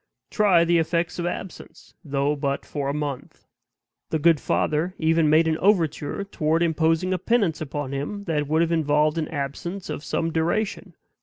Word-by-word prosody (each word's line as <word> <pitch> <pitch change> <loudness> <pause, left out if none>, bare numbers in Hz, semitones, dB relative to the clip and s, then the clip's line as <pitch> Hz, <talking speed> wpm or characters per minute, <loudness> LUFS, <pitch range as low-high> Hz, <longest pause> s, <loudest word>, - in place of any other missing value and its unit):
Try 190 -6 +4
the 170 0 +3
effects 170 +2 -1
of 175 - -1
absence, 180 +1 -8
though 140 0 0
but 140 -1 -2
for 140 -2 -3
a - - +1
month." 145 -3 -5 0.6
The 160 - 0
good 160 0 +4
father 160 +7 0
even 160 -1 +2
made 160 +2 +4
an 160 0 0
overture 175 -2 +1
toward 165 -4 0
imposing 165 +2 +1
a 185 - -1
penance 195 -7 +1
upon 145 -2 -4
him, 145 +9 -4
that 150 -6 -1
would 160 +3 +2
have 170 - -1
involved 155 0 +2
an 155 - -2
absence 160 +5 -5
of 150 - -5
some 165 +1 -1
duration. 175 +6 -1
160 Hz, 170 wpm, -24 LUFS, 150-170 Hz, 0.6 s, Try